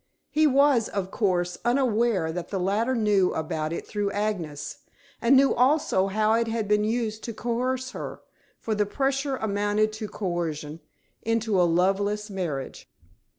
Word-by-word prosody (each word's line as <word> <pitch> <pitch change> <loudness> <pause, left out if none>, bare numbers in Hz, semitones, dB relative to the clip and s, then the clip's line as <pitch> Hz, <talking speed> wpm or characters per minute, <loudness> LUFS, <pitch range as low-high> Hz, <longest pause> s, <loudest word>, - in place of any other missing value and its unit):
He 310 0 +4
was, 275 -4 +4
of 195 -1 -3
course, 180 -4 0
unaware 235 -8 +2
that 175 +1 -5
the 195 - -2
latter 215 +7 +1
knew 210 -5 +3
about 155 0 -2
it 170 - -4
through 205 -2 -2
Agnes, 160 -9 -3 0.4
and 245 +3 +5
knew 275 0 +5
also 250 -7 +2
how 215 +2 +2
it 230 0 +2
had 225 -2 -2
been 210 0 +3
used 220 -1 -1
to 230 - -5
coerce 255 +3 -2
her - - -7 0.4
for 225 - -3
the 210 -1 +1
pressure 270 +3 0
amounted 210 0 0
to 215 0 -5
coercion 165 -6 -3 0.4
into 225 -4 +1
a 175 - +3
loveless 200 +4 +1
marriage. 165 -9 -4
210 Hz, 150 wpm, -26 LUFS, 185-235 Hz, 0.4 s, and